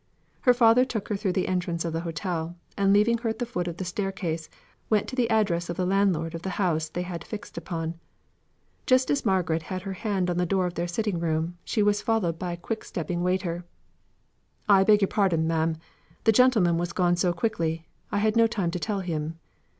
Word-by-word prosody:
Her 250 - +5
father 235 +1 +6
took 230 -6 -4
her 210 - 0
through 195 -2 -1
the 185 - 0
entrance 175 -2 -1
of 165 - -2
the 165 - -1
hotel, 170 0 -3 0.2
and 195 -1 +3
leaving 215 +3 +4
her 235 -1 -1
at 220 - -3
the 245 - -2
foot 180 -7 -3
of 170 -1 -4
the 185 - -4
staircase, 180 -4 -3 0.4
went 215 -2 +2
to - - -6
the 245 -3 +1
address 195 -7 +1
of 170 - -3
the 185 - 0
landlord 185 -4 +1
of 165 - -5
the 190 - -3
house 160 -5 0
they 175 +3 -3
had 175 -2 -6
fixed 215 +3 -8
upon. 165 -1 -4 0.9
Just 255 0 +4
as 280 -5 0
Margaret 175 -4 +1
had 185 +3 -5
her 195 -1 -4
hand 190 -3 -1
on 175 - -2
the 180 - +2
door 190 +1 +1
of 175 - -2
their 175 0 -2
sitting 195 0 -1
room, 165 +1 -1
she 215 - 0
was 205 0 +2
followed 185 -8 0
by 180 -1 -3
a - - -6
quick 220 +5 -4
stepping 175 0 -3
waiter: 180 -1 -1 1.0
"I 195 -2 +6
beg 210 +1 +5
your 195 - +4
pardon, 185 -7 +1
ma'am. 160 0 0 0.5
The 225 - +5
gentleman 215 -8 +4
was 175 0 -2
gone 175 -1 +2
so 175 0 +2
quickly, 165 -4 -1 0.3
I - - 0
had 215 +1 +2
no 230 0 +5
time 195 -7 -1
to 180 - -3
tell 200 +1 -2
him. 165 -2 -3
180 Hz, 220 wpm, -26 LUFS, 170-210 Hz, 1.0 s, father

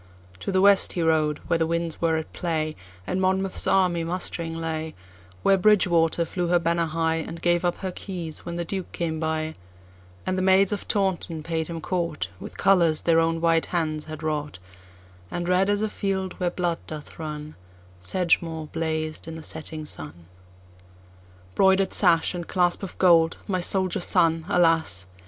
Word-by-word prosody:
To - - -3
the 190 0 +2
west 200 0 +5
he 175 - -1
rode, 155 -2 +2
where 165 - +1
the 160 - +1
winds 170 -1 -2
were 165 -1 +2
at 160 - -6
play, 155 -3 -2 0.3
And 185 - -1
Monmouth's 190 0 0
army 180 -3 +3
mustering 165 -1 -3
lay; 160 -1 -4 0.5
Where 195 -1 +4
Bridgewater 175 -5 +3
flew 175 +1 -2
her 175 +1 +4
banner 170 0 +1
high, 160 0 0
And 165 +1 -5
gave 175 0 +2
up 175 -1 +1
her 190 -1 -3
keys, 175 -4 -6
when 170 0 -5
the 170 0 -3
Duke 190 +1 -5
came 160 -2 -2
by; 160 0 -2 0.7
And 185 - -1
the - - 0
maids 190 +1 +4
of 205 - -4
Taunton 180 -5 -1
paid 160 -1 -2
him 165 -1 -5
courtWith 155 - -4
colors 170 -5 +3
their 165 -1 +3
own 165 0 +1
white 165 -1 +2
hands 155 -3 -2
had 155 0 -8
wrought; 150 -3 -2 0.7
And 175 0 -3
red 185 +2 +3
as 205 +1 +1
a - - +1
field, 195 -3 -2
where 180 -1 +1
blood 175 -1 -1
doth 155 0 -9
run, 150 -1 -6 0.5
Sedgemoor 165 - 0
blazed 160 -1 -3
in 165 - -6
the 160 - -8
setting 155 0 -5
sun. 80 - -7 1.3
Broider'd 190 - +3
sash 170 -3 +4
and 175 -2 -5
clasp 175 -2 +1
of 195 - -7
gold, 165 -3 +4
my 185 -2 0
soldier 185 0 +1
son, 165 -2 +2
alas! 165 - +2
170 Hz, 170 wpm, -25 LUFS, 160-185 Hz, 1.3 s, west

